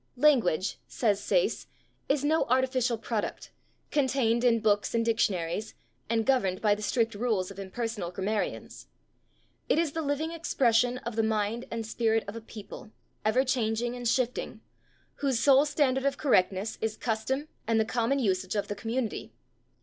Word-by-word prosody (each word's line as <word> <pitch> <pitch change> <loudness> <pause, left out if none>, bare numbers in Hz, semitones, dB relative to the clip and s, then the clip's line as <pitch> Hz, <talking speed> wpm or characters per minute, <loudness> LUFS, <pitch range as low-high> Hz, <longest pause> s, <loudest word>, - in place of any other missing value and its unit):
"Language," 240 - +3
says 205 -4 0
Sayce, - - 0 0.4
"is 280 0 +2
no 315 +2 +2
artificial 255 -1 +1
product, 220 -1 -4 0.4
contained 260 -5 +2
in 235 -2 +4
books 210 0 +1
and 230 0 +2
dictionaries 210 -4 0 0.3
and 225 -1 +1
governed 195 -9 +2
by 210 -2 +3
the 205 - -4
strict 225 +1 +1
rules 205 -4 -1
of 195 - -10
impersonal 205 -1 -4
grammarians. 195 +4 -3 0.8
It - - +3
is 330 -3 +1
the 325 - -3
living 300 +2 -1
expression 250 -7 +2
of 235 -1 -4
the 225 - +2
mind 220 +1 -1
and 230 -1 -4
spirit 225 0 +1
of 205 - -6
a 230 - -6
people, 220 -1 -10 0.3
ever 245 +5 +2
changing 240 -2 0
and 245 -1 -3
shifting, 250 +1 -1 0.6
whose 270 -4 0
sole 275 +2 +5
standard 270 -3 +1
of 275 0 +1
correctness 195 -5 +1
is 220 -1 -2
custom 260 +6 -2 0.2
and 225 -1 +3
the 220 - +2
common 235 +4 0
usage 190 -6 0
of 205 - -1
the 205 - -2
community.... 225 +2 -3
230 Hz, 155 wpm, -28 LUFS, 215-260 Hz, 0.8 s, sole